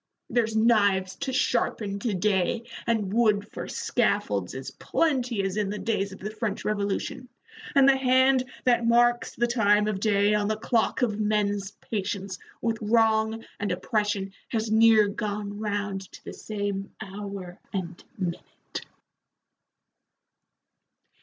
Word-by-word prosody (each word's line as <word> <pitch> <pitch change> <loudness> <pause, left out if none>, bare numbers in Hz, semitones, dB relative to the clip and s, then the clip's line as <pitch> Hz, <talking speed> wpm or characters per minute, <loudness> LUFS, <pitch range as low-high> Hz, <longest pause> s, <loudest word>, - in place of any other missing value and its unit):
There's 225 -2 +1
knives 205 -4 +3
to 265 - -3
sharpen 215 -5 0
to 210 -1 -1
day, 195 +3 +1 0.2
and 215 -4 0
wood 215 -3 +3
for - - -6
scaffolds - - 0
as - - -6
plenty 255 -9 0
as 195 +1 -2
in 210 -2 0
the 210 - -3
days 205 -3 -1
of 190 - -9
the 210 +2 -5
French 215 -2 -3
Revolution, 205 +4 -2 0.5
and 275 -1 +7
the 270 -1 +6
hand 260 0 +4 0.2
that 240 -2 +3
marks 240 +1 +3
the 240 - +2
time 210 -3 +3
of 210 -3 -1
day 205 0 +3
on 210 -1 +1
the 215 0 0
clock 230 +2 +1
of 215 -3 0
men's 205 -2 0
patience 195 -2 -3 0.2
with 225 -1 0
wrong 220 0 +2
and 205 -2 -1
oppression 200 +1 -1
has 220 -2 -2
near 220 -1 +6
gone 205 0 -4
round 205 -2 -3
to - - -13
the - - -7
same 200 -2 -4
hour 195 -3 -7
and 180 -3 -5
minute." 180 -3 -5
210 Hz, 140 wpm, -26 LUFS, 200-230 Hz, 0.5 s, and